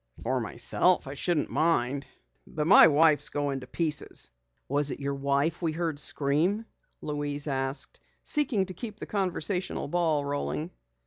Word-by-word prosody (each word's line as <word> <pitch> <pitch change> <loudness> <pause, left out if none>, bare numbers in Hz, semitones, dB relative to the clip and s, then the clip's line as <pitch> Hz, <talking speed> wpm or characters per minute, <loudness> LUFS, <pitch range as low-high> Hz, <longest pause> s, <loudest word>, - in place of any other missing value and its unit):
"For 130 +2 0
myself 120 - +1
I 135 - -6
shouldn't 155 +1 -1
mind, 140 -4 +1 0.4
but 150 -1 -3
my 190 +1 +9
wife's 155 0 +4
going 145 -2 -2
to 125 - -11
pieces." 150 - -2 0.4
"Was 145 +1 +1
it - - -4
your 140 0 -2
wife 140 +4 0
we 165 -2 0
heard 165 -3 -2
scream?" 155 +11 +1 0.4
Louise 145 -1 -2
asked, 135 -1 -2 0.2
seeking 255 -10 +1
to 185 - -7
keep 215 0 -7
the - - -5
conversational 190 -3 -1
ball 155 -3 +1
rolling. 145 +3 -3
150 Hz, 145 wpm, -28 LUFS, 140-175 Hz, 0.4 s, my